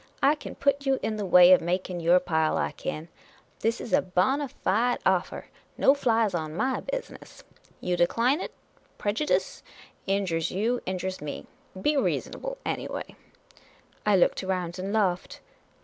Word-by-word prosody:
I 280 - +6
kin 300 - -8
put 280 0 0
you 270 -1 +2
in 215 -1 -1
the 205 -2 -3
way 180 0 +8
of 185 - +7
making 180 +1 -2
your 170 +2 +5
pile, 160 -3 0
I - - 0
kin. 155 +2 -5 0.5
This 225 +1 0
is - - -6
a - - +5
bona 260 +11 0 0.2
Jide 240 +5 +2
offer. - - 0 0.3
No 270 - +5
flies 230 -7 +1
on 155 -2 -3
my 260 +7 0
business! - - -7 0.4
You 180 0 0
decline 235 - +2
it? - - -5 0.5
Prejudice! 215 +9 -1 0.5
Injures 185 -4 0
you; 230 +6 -1
in 185 0 -1
jures 185 -1 -4
me! 150 -1 -6 0.3
Be 295 +8 +1
reasonable - - -2
anj'way! - - -4 0.5
" - - -31
I 210 -1 +3
looked 185 - +2
around 185 -2 -3
and 195 +2 -3
laughed. 190 -4 0
195 Hz, 160 wpm, -27 LUFS, 180-250 Hz, 0.5 s, way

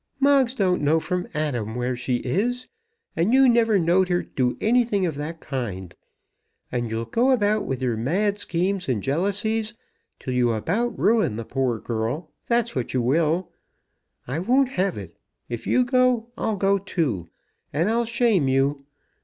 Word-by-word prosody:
"Moggs 275 -3 +3
don't 185 - +1
know 150 +3 +3
from 180 +2 -3
Adam 120 -8 -2
where 125 +1 -1
she 125 +1 -1
is; 245 - -1 0.5
and 195 +10 +2
you 270 0 +6
never 230 -3 +4
knowed 180 +2 +3
her 175 -1 0
do 125 -2 -1
anything 225 -4 +2
of 165 - -1
that 150 +3 -6
kind. 100 - -5 0.8
And 120 -2 -2
you'll 115 +1 -3
go 235 - +1
about 215 -4 +2
with 130 -1 -3
your 120 -3 0
mad 200 - 0
schemes 185 -1 -1
and 115 -6 -1
jealousies 205 +8 -1 0.4
till 130 - -5
you 120 -2 +2
about 205 - -1
ruin 215 - +2
the 115 +1 -5
poor 130 -2 -1
girl; 115 +8 -3 0.2
that's 235 -1 +1
what 130 0 -3
you 125 - +2
will. 160 +7 +1 0.8
I 135 +6 -2
won't 255 +8 +2
have 195 -6 -1
it. 90 -5 -9 0.3
If 120 -1 -5
you 255 - +3
go, 250 -2 +2
I'll 220 -2 -2
go 195 +1 +2
too, 150 - -2 0.4
and 160 +6 0
I'll 235 +2 +1
shame 230 - +2
you. 140 +1 +1
175 Hz, 165 wpm, -24 LUFS, -, 0.8 s, you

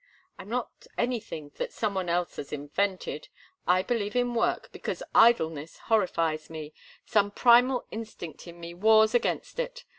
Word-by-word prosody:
"I'm 195 - -9
not 245 +1 -4
anything 215 -12 -3
that - - -3
some 215 -3 -1
one 185 -2 -2
else 175 0 -1
has 140 - -6
invented. 185 - -2 0.4
I 185 +1 +4
believe 210 -3 -2
in 245 -1 +1
work, 230 - 0
because - - -5
idleness 165 -10 +4
horrifies 165 -7 0
me; 155 -1 -7 0.3
some 205 -1 +2
primal 245 +4 +4
instinct 215 -7 -8
in 170 0 -11
me 170 0 -7
wars 220 +4 +5
against 240 - -1
it. - - -4
205 Hz, 150 wpm, -28 LUFS, 170-235 Hz, 0.4 s, wars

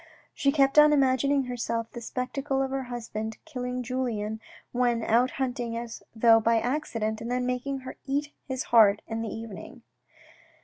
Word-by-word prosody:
She 275 - +2
kept 275 0 +4
on 300 0 +7
imagin 270 -1 +3
ing 280 -1 +3
to 250 - -8
herself 230 -2 -2
the 240 - -8
spectacle 270 +3 -2
of 265 - -3
her 270 -1 -2
husband 220 -2 -5
killing 250 0 -4
Julien 225 -4 -2 0.3
when 240 -2 +1
out 240 +4 +3
hunting 245 -3 -2
as 235 -1 -6
though 225 0 +6
by 230 +1 +3
accident, 230 -4 -2
and 230 - -5
then 250 0 0
making 255 +2 -2
her 260 - -8
eat 290 +2 -1 0.2
his 260 -2 -2
heart 210 -3 +6
in 225 0 -4
the 225 - -3
evening. 225 +2 -8
245 Hz, 175 wpm, -27 LUFS, 230-265 Hz, 0.3 s, on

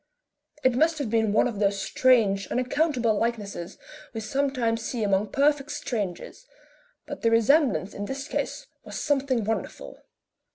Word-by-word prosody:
It 255 - +4
most 320 +6 +2
have 275 -8 -3
been 220 -2 +2
one 215 - +3
of 225 -5 -5
those 200 -1 +1
strange, 205 -6 +2
unaccountable 255 -2 +1
likenesses 210 -7 -3 0.4
we - - -2
sometimes 245 -2 0
see 225 0 -3
among 200 0 +1
perfect 285 +3 +1
strangers, 215 - -5 0.6
but - - -7
the 230 - +3
resemblance 230 - +3
in 205 - -5
this 275 +6 -6
ease - - -2 0.2
was - - -6
something 270 -5 0
wonderful. 220 +2 -4
235 Hz, 140 wpm, -26 LUFS, 210-275 Hz, 0.6 s, It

